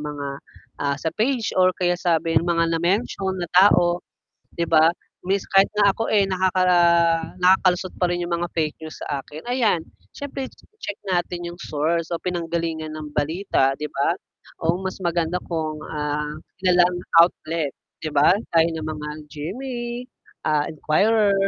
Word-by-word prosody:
mga, 145 -1 -5 0.5
ah, 140 0 0
sa 160 +1 -2
page 235 0 0
or 185 0 +6
kaya 175 -1 +1
sabi 165 -2 0
mga 165 0 +1
na 165 - 0
mention 190 0 0
na 175 - -2
tao. 175 -2 +5 0.6
'di 170 - +1
ba 160 0 +5 0.4
means 195 +1 0
kahit 195 0 +6
nga 205 -1 +5
ako 225 - -3
eh, 205 -2 +5
nakaka 185 0 +1 0.8
nakakalusot 185 0 +3
pa 180 - +3
rin 175 - -2
yung 175 - -4
mga 170 +1 -1
fake 155 -2 0
news 155 -1 -8
sa 140 -2 -3
akin 155 +2 -10
ayan 235 -8 +2 0.3
siyempre 275 -1 -5 0.3
check 205 - -4 0.2
natin 175 0 -1
yung 175 0 -9
source 160 +1 -1
o 165 - -3
pinanggalingan 165 -3 -3
ng 155 -1 -6
balita 150 -3 +1
di 150 - -3
ba 140 +5 +1 0.5
o 165 +2 +1
mas 190 0 -4
maganda 170 0 0
kung 155 -2 -2
ah 150 0 -2 0.3
kilalang 180 -1 +4 0.2
outlet 165 -3 +2 0.3
'di 155 -1 -5
ba 145 +6 +5 0.2
gaya 165 0 +5
ng 160 -2 -4
mga 150 -1 -5 0.2
GMA, 240 - -5 0.6
ah 150 -1 +2
Inquirer, 200 +7 +2
170 Hz, 155 wpm, -23 LUFS, 155-185 Hz, 0.8 s, or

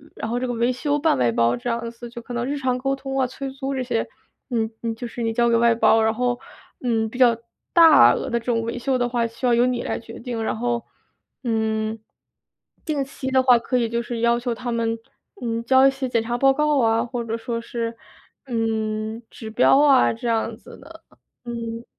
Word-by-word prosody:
然 220 - -5
后 245 - 0
这 255 - -2
个 245 - -2
维 235 +2 +1
修 290 +3 -1
半 295 - +2
外 120 -2 +2
包 115 +1 +2
这 245 - -4
样 235 0 -2
子， 235 0 -10
就 235 0 -9
可 245 - -9
能 240 0 -2
日 285 +2 -2
常 255 -2 0
沟 270 +2 -1
通 270 0 -4
啊、 260 - +2
催 270 +2 -6
租 270 +1 -4
这 260 - -1
些， 235 -2 -1 0.4
嗯， 225 -2 -1
你 230 -1 -3
就 240 +1 -6
是 235 - -7
你 225 0 0
交 235 +1 +2
给 230 - +4
外 235 0 +4
包， 225 0 +4
然 220 0 +2
后， 245 +1 -1 0.4
嗯， 225 -3 0
比 245 - -9
较 240 -3 +5 0.4
大 325 -4 +8
额 - - -3
的 235 - 0
这 230 - -17
种 230 -2 +1
维 230 +1 -4
修 260 +1 0
的 245 -1 0
话 235 -1 0
需 230 +3 -6
要 240 - +4
由 240 +1 +4
你 250 -1 0
来 - - -2
决 230 0 -10
定。 230 -2 -4
然 220 - -2
后， 240 0 -1 0.6
嗯， 220 -1 -1 0.9
定 295 -4 -1
期 265 -1 -6
的 260 0 +4
话 250 -2 +6
可 250 +2 -1
以 235 -2 +1
就 235 +1 -1
是 235 -1 -5
要 235 0 +3
求 240 0 -2
他 240 +1 -5
们， 230 0 -1 0.4
嗯， 230 -1 -2
交 260 +2 +5
一 - - +4
些 265 -1 -4
检 230 -2 +1
查 240 +1 -2
报 270 +1 +5
告 300 +1 +1
啊， 225 0 +2
或 240 -1 -4
者 230 0 -3
说 230 0 -4
是， 230 0 -4 0.5
嗯， 220 -1 -2
指 220 - -9
标 245 +4 +4
啊 275 -3 +5
这 230 +1 -5
样 225 -1 0
子 - - -14
的， 320 +4 -14 0.4
嗯。 230 0 -5
235 Hz, 250 characters per minute, -23 LUFS, 230-255 Hz, 0.9 s, 大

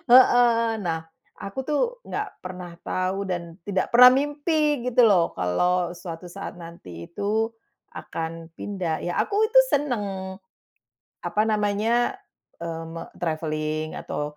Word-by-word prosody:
Heeh. 235 -2 +6
Nah, 165 -4 -2 0.3
aku 195 +5 -8
tuh, 300 +5 +1 0.2
nggak 415 0 -3
pernah 180 -2 -8
tahu, 190 +2 -2
dan 170 -2 -4
tidak 190 -2 0
pernah 250 +1 +10
mimpi, 290 -1 +1
gitu 250 0 +4
loh, 195 -7 +4
kalo 175 - +1
suatu 175 0 -8
saat 195 +2 -7
nanti 165 - -10
itu, 215 +4 0 0.4
akan 165 0 -6
pindah. 180 -6 -3
Ya, 175 - -2
aku 420 +1 +1
itu - - +6
seneng. 205 - -2 0.9
Apa 215 +1 +1
namanya? 220 - +1 0.4
Eee, 165 -1 -4
me 165 +1 -7
travelling, 155 -1 -2
atau, 150 0 -4
190 Hz, 125 wpm, -25 LUFS, 165-235 Hz, 0.9 s, pernah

